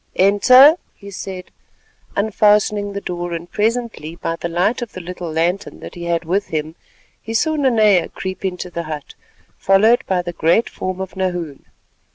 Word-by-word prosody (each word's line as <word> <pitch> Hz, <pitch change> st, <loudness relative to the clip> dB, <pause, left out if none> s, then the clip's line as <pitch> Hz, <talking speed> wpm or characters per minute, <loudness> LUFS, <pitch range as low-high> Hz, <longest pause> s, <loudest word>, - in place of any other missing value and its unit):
"Enter," 255 Hz, -, +7 dB, 0.2 s
he 200 Hz, 0 st, -12 dB
said, 185 Hz, -1 st, -7 dB, 0.6 s
unfastening 205 Hz, 0 st, +2 dB
the 200 Hz, -, -4 dB
door, 175 Hz, -1 st, -4 dB
and 170 Hz, +1 st, -6 dB
presently 220 Hz, -7 st, -2 dB
by 165 Hz, -1 st, -3 dB
the 170 Hz, -, -5 dB
light 180 Hz, +9 st, 0 dB
of 240 Hz, -, -6 dB
the -, -, -7 dB
little 180 Hz, -1 st, -6 dB
lantern 175 Hz, +5 st, -1 dB
that -, -, -9 dB
he 175 Hz, -1 st, -7 dB
had 170 Hz, 0 st, -1 dB
with 195 Hz, +5 st, 0 dB
him, 155 Hz, 0 st, -3 dB, 0.5 s
he 225 Hz, +1 st, -6 dB
saw 315 Hz, +6 st, +1 dB
Nanea 220 Hz, -, +3 dB
creep 190 Hz, 0 st, -6 dB
into 180 Hz, -1 st, -4 dB
the 170 Hz, -, -3 dB
hut, 150 Hz, -2 st, -6 dB, 0.5 s
followed 220 Hz, +6 st, +4 dB
by 180 Hz, -2 st, 0 dB
the 175 Hz, 0 st, -5 dB
great 170 Hz, +8 st, +2 dB
form 185 Hz, 0 st, -4 dB
of 190 Hz, 0 st, -6 dB
Nahoon. 175 Hz, -6 st, -3 dB
190 Hz, 170 wpm, -19 LUFS, 170-210 Hz, 0.6 s, Enter